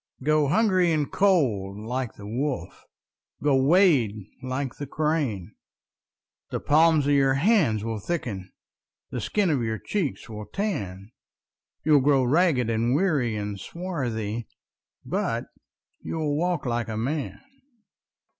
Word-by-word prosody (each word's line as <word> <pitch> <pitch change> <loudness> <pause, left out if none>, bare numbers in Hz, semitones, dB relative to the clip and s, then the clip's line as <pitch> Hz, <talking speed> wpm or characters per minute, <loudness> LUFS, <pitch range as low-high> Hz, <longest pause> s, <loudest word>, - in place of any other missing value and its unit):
Go 155 0 +3
hungry 185 0 +3
and 150 -3 0
cold 120 - +2
like 120 +3 -4
the 100 - -11
wolf, 130 +6 -3 0.6
Go 145 -2 +4
wade 145 - +4 0.3
like 130 0 -3
the 145 - -5
crane:The 145 - -5
palms 155 0 +4
of 145 - +3
your 135 -1 +4
hands 140 - +3
will 115 -1 -3
thicken, 105 - -4 0.6
The - - -3
skin 200 -5 +1
of 140 -5 +1
your 110 -1 -1
cheek 175 - -2
will 105 -2 -8
tan, 100 - -4 0.7
You 155 -1 +5
'll - - +3
grow 135 -1 +4
ragged 140 -2 +3
and 115 +2 +1
weary 145 - +1
and 105 -1 -4
swarthy, 120 - -4 0.6
But - - -1 0.6
you - - -4
'll 150 -2 0
walk 175 -1 0
like 120 -1 -1
a 110 - -3
man! 140 +6 -2
135 Hz, 130 wpm, -25 LUFS, 110-160 Hz, 0.7 s, You